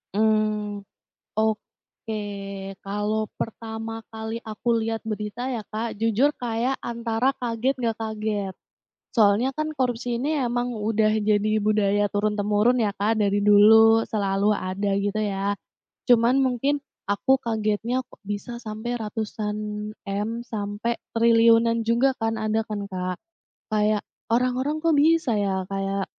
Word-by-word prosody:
Mmm. 215 -1 +1 0.5
Oke. 220 0 -3 0.7
Kalau 210 +2 -1
pertama 225 0 -5
kali 220 +1 -4
aku 225 +2 0
lihat 225 0 -2
berita 215 +4 -3
ya 235 -4 -3
Kak, 220 0 -4
jujur 225 +5 +3
kayak 245 +2 -1
antara 235 +2 0
kaget, 240 +2 0
nggak 230 -2 -1
kaget. 215 -3 -3 0.6
Soalnya 220 +4 +4
kan, 310 0 -2
korupsi 245 -3 -1
ini 300 +3 0
emang 245 -2 0
udah 215 0 +2
jadi 215 0 +2
budaya 205 -1 +2
turun-temurun 210 +3 +2
ya 215 -4 +1
Kak, 210 +3 0
dari 205 -1 +2
dulu 220 +2 +7
selalu 200 0 +1
ada, 195 +1 -2
gitu 205 +1 -1
ya. 200 -1 -1 0.5
Cuman 240 +2 +5
mungkin, 265 +3 +1 0.3
aku 260 +6 +3
kagetnya, 225 +3 -1
kok - - -20
bisa 205 +4 -4
sampai 220 +2 -4
ratusan 210 -1 -3 0.5
M, 200 +2 -2 0.2
sampai 210 +1 -3 0.2
triliunan 230 0 +5
juga 235 +4 +2
kan, 225 0 -1
ada 220 0 0
kan 205 -2 -4
Kak? 185 -2 -4 0.6
Kayak, 210 0 +2 0.3
orang-orang 255 +5 +1
kok 330 - +4
bisa 315 -3 +4
ya? 190 -2 0
Kayak, 195 0 -1
220 Hz, 125 wpm, -24 LUFS, 205-235 Hz, 0.7 s, dulu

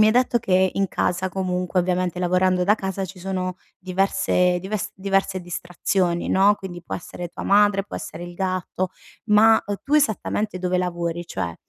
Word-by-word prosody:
mi 215 - +7
hai - - +5
detto 245 -1 +3
che 190 -4 +2
in 195 -1 +1
casa 180 +1 0
comunque, 180 -1 -1
ovviamente 180 0 0
lavorando 180 0 +2
da 205 +3 +5
casa, 195 -1 -3
ci 185 0 -10
sono 185 0 -2 0.2
diverse 185 -1 +1
dives 215 +3 -3
diverse 195 -1 0
distrazioni, 175 0 -1
no, 200 +2 +4
quindi 175 -3 -8
può - - -4
essere 175 0 -7
tua - - -8
madre, 205 -1 +4
può - - -10
essere 170 +2 -6
il 175 - -9
gatto; 185 0 -2 0.4
ma, 220 +1 +6
uhm, 205 0 -3
tu 285 - 0
esattamente 215 -7 +1
dove 180 0 0
lavori? 175 -1 -2
Cioè 85 - -4
185 Hz, 175 wpm, -23 LUFS, 180-195 Hz, 0.4 s, mi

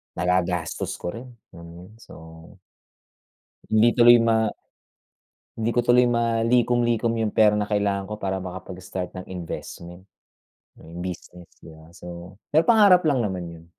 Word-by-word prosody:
nagagastos 90 -2 -1
ko 85 - -5
rin, 120 +6 -9 0.2
alam 85 0 -13
mo 85 - -13 0.2
yun? - - -19
So - - -15 1.6
hindi 110 +2 +4
tuloy 120 0 +7
ma 110 -2 +1 1.1
hindi 110 +1 0
ko 120 - +2
tuloy 120 +1 +4
malikom-likom 120 0 +1
yung 110 -2 -2
pera 105 -1 +4
na 105 - -2
kailangan 100 -2 -1
ko 105 - -5
para 95 -2 -3
makapag-start 90 0 -7
ng 90 - -9
investment, 90 0 -8 0.7
'no, - - -16
yung 85 +1 -9
business, 90 -1 -9
di - - -14
ba? 80 +1 -15
So, 90 +2 -11 0.2
may 160 - +5
pangarap 200 -6 +5
lang 145 -5 +2
naman 95 -5 -3
yon. 80 -1 -14
105 Hz, 150 wpm, -23 LUFS, 90-115 Hz, 1.6 s, tuloy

